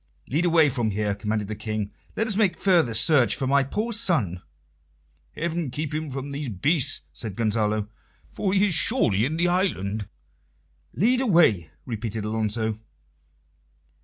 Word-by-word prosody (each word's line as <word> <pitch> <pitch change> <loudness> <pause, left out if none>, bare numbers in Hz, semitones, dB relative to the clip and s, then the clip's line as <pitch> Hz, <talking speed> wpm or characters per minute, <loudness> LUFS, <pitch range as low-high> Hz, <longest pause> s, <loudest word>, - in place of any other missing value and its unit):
"Lead 160 +6 +1
away 165 -3 +5
from 120 -4 -1
here," 105 0 -1
commanded 105 0 -2
the 110 - -4
King. 110 -1 -4 0.3
"Let 220 - +1
us 220 -3 0
make 195 -5 +2
further 170 - +3
search 120 -1 +4
for 135 - -3
my 140 +1 +3
poor 215 - -3
son." 135 - 0 0.9
"Heaven 170 -2 -2
keep 150 +4 -4
him 155 0 -3
from 135 +1 -5
these 140 -1 -4
beasts!" 140 - +1
said 110 -5 -5
Gonzalo. 110 -1 0 0.4
"For 195 - -2
he 195 +1 +3
is 195 - +1
surely 120 - +2
in 155 +4 -2
the 175 +1 +2
island." 110 - -1 0.9
"Lead 250 +6 +3
away," 160 - +3 0.2
repeated 110 -3 -4
Alonso. 110 0 -2
130 Hz, 150 wpm, -25 LUFS, 110-170 Hz, 0.9 s, away